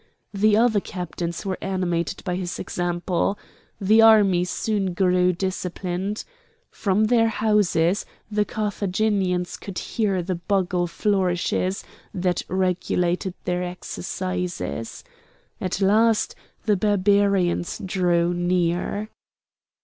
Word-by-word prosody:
The 210 +1 +3
other 225 -2 +4
captains 175 -1 -5
were 190 -1 -2
animated 180 -3 -2
by 180 -3 -2
his 180 -1 -4
example. 175 +2 -1 0.4
The 215 +3 +5
army 205 -5 +6
soon 195 -1 -1
grew 180 -1 +3
disciplined. 185 +2 -3 0.5
From 200 0 +1
their 225 +1 +4
houses 205 -5 +2 0.3
the 210 0 +2
Carthaginians 200 -3 -1
could 195 -3 -8
hear 195 -5 -1
the 185 +2 -2
bugle 180 0 0
flourishes 185 0 0 0.3
that 180 -1 0
regulated 180 0 0
their 180 0 -1
exercises. 180 -6 -4 0.6
At 185 +1 -2
last 215 +2 +3 0.3
the 210 -2 +3
Barbarians 200 -3 +2
drew 175 -2 +1
near. 175 +4 0
185 Hz, 100 wpm, -23 LUFS, 180-205 Hz, 0.6 s, army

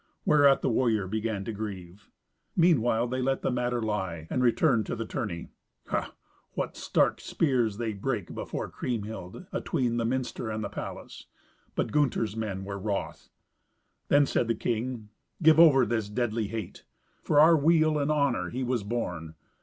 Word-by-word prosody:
Whereat 145 -3 +5
the - - +2
warrior 110 -4 +2
began 110 0 -2
to - - -3
grieve. 100 -2 -7 0.5
Meanwhile 120 -9 +3
they 130 +1 -2
let 135 +1 0
the - - +1
matter 125 -1 -1
lie, 95 -7 -3
and 125 - 0
returned 120 -2 +3
to - - -2
the 115 -1 -4
tourney. 90 -6 -4 0.4
Ha! - - -2 0.4
what - - -3
stark - - +1
spears 120 -9 0
they 115 -2 -2
brake 105 -1 -3
before - - -4
Kriemhild, 105 -6 -5
atween 120 -2 -1
the 115 - 0
minster 125 -1 -2
and 110 0 -3
the 100 - -3
palace; - - -8 0.5
but - - -1
Gunther's 125 -7 +1
men 105 -4 -3
were 100 0 -5
wroth. 100 0 -4 0.8
Then 145 0 +5
said 120 - 0
the 115 - +1
king, 115 -1 -3 0.3
"Give 160 0 +7
over 140 -6 +7
this 110 -2 -1
deadly 115 -1 -1
hate. 110 -3 -6 0.4
For 145 - +3
our 165 +2 +8
weal 155 0 +3
and 140 +1 0
honour 140 -4 +1
he 130 +2 -3
was 125 -2 0
born. 90 -8 -4
115 Hz, 160 wpm, -28 LUFS, 105-130 Hz, 0.8 s, our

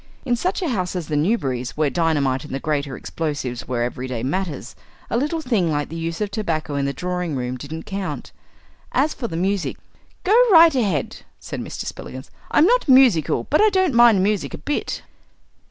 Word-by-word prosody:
In 245 -2 +2
such 365 +9 -1
a 340 - 0
house 185 -7 -2
as 170 -4 -4
the 150 - -1
Newberry's, 140 - -1
where 150 -2 +1
dynamite 145 -5 +1
and 150 -3 -6
the - - -2
greater 140 -3 -2
explosives 145 -7 -4
were 120 -1 -1
everyday 125 -1 -4
matters, 145 -3 -3 0.4
a - - +1
little 300 +6 0
thing 215 - +1
like 145 -1 -1
the 165 - -7
use 165 0 -3
of 205 -1 -1
tobacco 165 -8 -2
in 140 -1 0
the 140 - 0
drawing 180 0 -3
room 125 -1 -3
didn't 155 +5 -7
count. 195 -1 -5 0.6
As 290 +4 +2
for 240 - -4
the 165 - -5
music, 195 +2 -1 0.5
"Go 400 - +2 0.2
right 330 -2 +8
ahead," 200 - 0 0.2
said - - -6
Mr. - - -6
Spillikins; 130 +1 -8 0.2
"I'm 310 - +5
not - - +2
musical, 255 - +5
but 305 - +3
I 430 - +6
don't 375 -6 +2
mind 235 -5 +6
music 205 0 0
a - - -8
bit." 295 - -3
170 Hz, 190 wpm, -22 LUFS, 140-235 Hz, 0.6 s, right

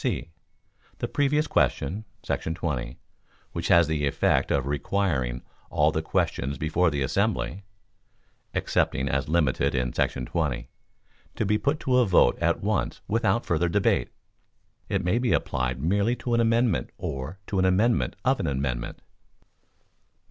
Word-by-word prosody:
(c) 85 - -2 0.7
The - - -2
previous 150 +1 +1
question 95 +11 0 0.2
[§ 80 - -2
20], 65 -9 -3 0.5
which - - -3
has 85 -1 +6
the 75 -2 0
effect - - +1
of 70 -2 +1
requiring 70 -4 -1 0.3
all 75 +1 +3
the 80 - -1
questions 70 -3 -1
before 80 +4 +2
the 70 -3 -1
assembly 65 +7 -1 0.9
[excepting 65 +2 0
as 70 +1 -1
limited 75 -5 +1
in 60 -1 0
§ 60 - -1
20] - - -2 0.7
to 110 - -1
be 105 +2 +2
put 145 +2 0
to 125 -1 +3
vote 90 - +4
at - - +1
once - - -1
without 115 +2 +1
further 85 0 +1
debate. 60 - +1 0.8
It 95 -1 0
may 90 +7 +2
be 125 -1 +1
applied 65 0 -1
merely 100 - +1
to 120 -1 -3
an 115 - +3
amendment 115 - +2
or 70 +7 -5
to 100 - -1
an 95 - +3
amendment 105 +6 +2
of 130 -1 +3
an 90 - -1
amendment. 65 -3 -3
80 Hz, 145 wpm, -26 LUFS, 65-105 Hz, 0.9 s, has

